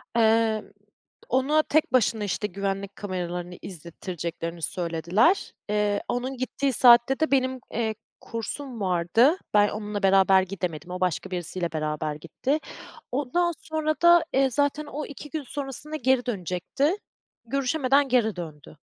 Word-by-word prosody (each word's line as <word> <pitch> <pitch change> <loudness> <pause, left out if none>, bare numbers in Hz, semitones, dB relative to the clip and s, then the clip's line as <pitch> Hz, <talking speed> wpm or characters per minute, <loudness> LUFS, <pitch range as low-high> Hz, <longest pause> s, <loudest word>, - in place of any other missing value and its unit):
Emm, 225 -1 +3 0.6
ona 285 +5 +3
tek 305 -3 +1
başına, 225 -3 +2
işte, 200 +1 -1
güvenlik 195 +1 -3
kameralarını 180 -2 -4
izlettireceklerini 170 -1 -6
söylediler. 175 - +1 0.2
Eee, 210 -1 +1
onun 255 +2 -2
gittiği 260 +1 -1
saatte 240 +3 +6
de 315 -2 +1
benim, 260 -1 +2
eee, 220 -1 -1 0.3
kursum 235 +1 -6
vardı. 190 - +3 0.2
Ben 205 0 +5
onunla 210 -1 -4
beraber 190 0 +5
gidemedim. 180 -3 -5
O 180 - -4
başka 180 0 -1
birisiyle 175 -1 -3
beraber 155 -1 -2
gitti. 250 - -2 0.5
Ondan 295 +7 +1
sonra 310 -1 -1
da, 345 -1 +7
eee, 270 0 +3
zaten 285 +3 +1
o 295 +1 -5
2 290 +1 -10
gün 310 -1 -4
sonrasında 285 +3 -4
geri 260 -2 +2
dönecekti. 220 - -1 0.5
Görüşemeden 275 +2 +2
geri 235 -5 +2
döndü. 155 -3 -9
220 Hz, 130 wpm, -26 LUFS, 180-270 Hz, 0.6 s, da